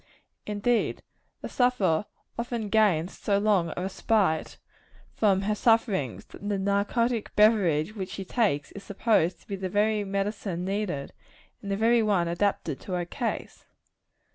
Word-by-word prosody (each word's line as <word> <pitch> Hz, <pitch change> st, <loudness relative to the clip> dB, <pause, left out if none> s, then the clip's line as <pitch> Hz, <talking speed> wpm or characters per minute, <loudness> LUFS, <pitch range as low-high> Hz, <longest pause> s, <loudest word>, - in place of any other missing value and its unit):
Indeed, 210 Hz, +3 st, 0 dB, 0.4 s
the -, -, -5 dB
sufferer 210 Hz, -9 st, +1 dB, 0.3 s
often 235 Hz, -3 st, -3 dB
gains 195 Hz, -5 st, +2 dB
so 200 Hz, -1 st, 0 dB
long 200 Hz, -5 st, +2 dB
a 180 Hz, -, -2 dB
respite 190 Hz, -3 st, 0 dB, 0.6 s
from 195 Hz, -3 st, +2 dB
her 210 Hz, +2 st, +1 dB
sufferings, 210 Hz, -, +1 dB
that 205 Hz, -, -8 dB
the 205 Hz, -, 0 dB
narcotic 205 Hz, +4 st, 0 dB
beverage 205 Hz, -4 st, +3 dB
which 190 Hz, -2 st, -4 dB
she 195 Hz, -1 st, -6 dB
takes 185 Hz, -10 st, 0 dB
is 200 Hz, -, -10 dB
supposed 200 Hz, -4 st, +1 dB
to -, -, -24 dB
be 200 Hz, -, -3 dB
the 190 Hz, -1 st, -4 dB
very 210 Hz, +2 st, +1 dB
medicine 195 Hz, -2 st, -3 dB
needed, 190 Hz, -8 st, -3 dB, 0.5 s
and 200 Hz, -, -7 dB
the 195 Hz, -, 0 dB
very 230 Hz, +2 st, +4 dB
one 200 Hz, -6 st, +2 dB
adapted 170 Hz, -4 st, -1 dB
to 185 Hz, -, -7 dB
her 175 Hz, -1 st, -1 dB
case. 235 Hz, +6 st, -5 dB
200 Hz, 145 wpm, -27 LUFS, 185-220 Hz, 0.6 s, very